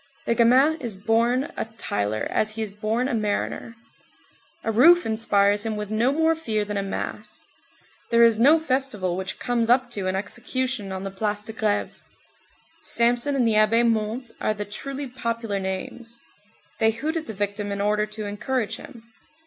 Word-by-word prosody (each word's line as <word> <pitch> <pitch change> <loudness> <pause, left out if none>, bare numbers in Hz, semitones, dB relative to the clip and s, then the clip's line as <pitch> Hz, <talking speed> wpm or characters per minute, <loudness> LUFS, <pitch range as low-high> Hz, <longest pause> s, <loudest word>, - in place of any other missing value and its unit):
The - - +2
gamin 260 +7 +4
is 230 -6 -4
born 235 +6 +1
a - - -2
tiler 105 - -2
as 215 0 +1
he 220 0 -3
is 205 -2 -6
born 220 +4 -1
a 270 - -2
mariner. 215 +1 -2 0.9
A 225 - 0
roof 335 +11 +6
inspires 205 -2 +2
him 220 -1 -2
with 210 0 -5
no 230 +4 +2
more 320 +2 +3
fear 220 -10 -2
than 205 0 -4
a - - +1
mast. 210 +2 -6 0.7
There 235 0 +5
is 230 -2 +5
no 285 +7 +7
festival 260 - -1
which 190 0 -4
comes 235 -2 0
up 250 0 +3
to 200 -5 -3
an 185 - 0
execution 240 +2 -3
on 190 0 -4
the 195 - -4
Place 205 +1 -2
de 220 - -8
Grève. 215 -2 -1 0.8
Samson 240 +4 +2
and 250 -4 +2
the 225 - +3
Abbé 220 +2 +4
Montès 225 +2 -1
are 215 - 0
the 205 0 -4
truly 275 +7 -6
popular 230 -4 -3
names. 225 +5 -5 0.6
They 220 - +4
hoot 295 +9 -2
at 325 -1 -3
the 220 - -5
victim 205 +1 -2
in 200 - -3
order 210 +1 +1
to 215 0 -6
encourage 210 +3 -2
him. 235 -5 -12
225 Hz, 180 wpm, -24 LUFS, 205-245 Hz, 0.9 s, no